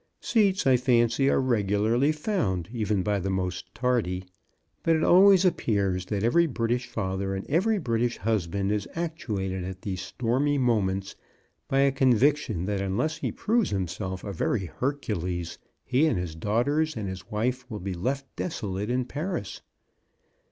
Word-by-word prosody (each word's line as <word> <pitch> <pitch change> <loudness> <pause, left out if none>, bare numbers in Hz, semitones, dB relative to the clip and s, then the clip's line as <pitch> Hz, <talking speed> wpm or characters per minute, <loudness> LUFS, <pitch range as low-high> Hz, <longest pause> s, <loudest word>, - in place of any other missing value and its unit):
Seats, 200 -6 +2
I 130 -2 +5
fancy, 120 +1 +3
are - - +3
regularly 115 +2 +2
found, 150 - -1
even 105 -4 0
by 105 0 0
the 95 +1 -2
most 90 -1 -2
tardy, 115 -8 0 0.6
but 165 - +3
it 160 - +1
always 190 +1 +6
appears 100 - +1
that 105 0 -2
every 170 +9 +4
British 120 -2 -1
father 95 -3 -2
and 95 - -5
every 205 +9 +2
British 120 - 0
hus 105 -5 0
band 100 +3 -1
is 105 -2 -1
actuated 105 - -3
at 95 0 -7
these 95 -3 -3
stormy 125 +8 0
moments 100 -6 0 0.5
by 135 0 +2
a 140 0 +4
conviction 130 - +2
that 100 0 -1
unless 100 +12 -1
he - - -2
proves 230 0 +1
himself 95 0 -3
a 100 - -5
very 95 +3 0
Hercules 90 - -3 0.3
he 130 +5 +3
and 125 - +1
his 90 -3 -3
daughters 125 - 0
and 105 -3 -3
his 95 -1 -7
wife 125 +4 -2
will 105 -3 -5
be 95 +1 -4
left 130 +10 -2
desolate 105 - -3
in 125 0 0
Paris. 145 - -4
115 Hz, 160 wpm, -27 LUFS, 95-140 Hz, 0.6 s, always